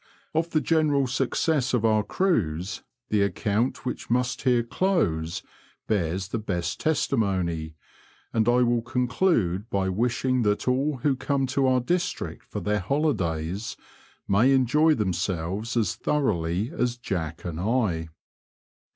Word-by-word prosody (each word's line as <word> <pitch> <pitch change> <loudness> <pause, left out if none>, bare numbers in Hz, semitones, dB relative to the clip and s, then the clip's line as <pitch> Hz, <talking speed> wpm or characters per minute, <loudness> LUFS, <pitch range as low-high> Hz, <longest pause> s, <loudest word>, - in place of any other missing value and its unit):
Of 160 +1 +1
the 155 - +1
general 150 -4 +2
success 135 +1 0
of 115 -2 +1
our 110 -1 +4
cruise, 95 - -1 0.3
the 105 -1 +2
account 105 +5 0
which 125 - -4
must 125 +1 0
here 125 -3 +3
dose 115 - 0 0.4
bears 95 -2 -1
the 115 - -2
best 85 -5 -3
testimony, 95 - 0 0.6
and 110 0 +2
I 125 +1 +4
will 120 -1 +2
conclude 120 - 0
by 95 -4 0
wishing 125 +5 +1
that 105 +1 0
all 135 +3 +1
who 145 -3 +3
come 135 +1 0
to 135 -2 +2
our 130 -1 +3
district 175 +8 -2
for - - -5
their 105 0 0
holidays 95 - -1 0.5
may 110 +7 +4
enjoy 150 +5 +4
themselves 95 +2 -2
as 110 -6 +1
thoroughly 95 - 0
as 125 -4 0
Jack 85 -9 -4
And 85 -2 -4
I. 95 -6 0
115 Hz, 135 wpm, -26 LUFS, 95-130 Hz, 0.6 s, our